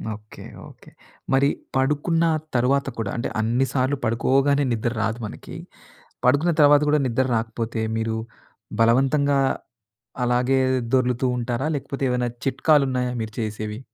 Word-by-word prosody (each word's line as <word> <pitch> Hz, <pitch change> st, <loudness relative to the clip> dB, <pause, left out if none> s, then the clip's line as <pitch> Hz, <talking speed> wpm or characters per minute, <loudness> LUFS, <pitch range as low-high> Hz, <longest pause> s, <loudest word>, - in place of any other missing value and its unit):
Okay. 105 Hz, 0 st, -13 dB, 0.3 s
Okay. -, -, -17 dB, 0.4 s
మరి 135 Hz, +1 st, +4 dB, 0.3 s
పడుకున్న 150 Hz, +5 st, +1 dB, 0.3 s
తరువాత 135 Hz, +3 st, +2 dB
కూడా 110 Hz, -3 st, -3 dB
అంటే 120 Hz, -, -2 dB
అన్ని 120 Hz, +4 st, +1 dB
సార్లు 130 Hz, +1 st, +1 dB
పడుకోగానే 135 Hz, +5 st, +2 dB
నిద్ర 115 Hz, +1 st, -1 dB
రాదు 110 Hz, +4 st, -1 dB
మనకి. 105 Hz, -, -9 dB, 0.7 s
పడుకున్న 145 Hz, +7 st, +3 dB
తర్వాత 145 Hz, 0 st, +7 dB
గూడా 150 Hz, 0 st, +3 dB
నిద్ర 130 Hz, +2 st, +1 dB
రాకపోతే, 115 Hz, 0 st, -3 dB, 0.2 s
మీరు 110 Hz, 0 st, -1 dB, 0.6 s
బలవంతంగా 135 Hz, +5 st, +3 dB, 0.9 s
అలాగే 125 Hz, +2 st, +2 dB, 0.3 s
దొర్లుతూ 130 Hz, 0 st, +2 dB
ఉంటారా? 120 Hz, +4 st, -2 dB
లేకపోతే 140 Hz, 0 st, -5 dB
ఏమైనా 125 Hz, 0 st, 0 dB, 0.2 s
చిట్కాలున్నాయా 135 Hz, -2 st, +2 dB
మీరు 110 Hz, -1 st, -6 dB
చేసేవి? 110 Hz, -1 st, -4 dB
125 Hz, 120 wpm, -23 LUFS, 115-140 Hz, 0.9 s, తర్వాత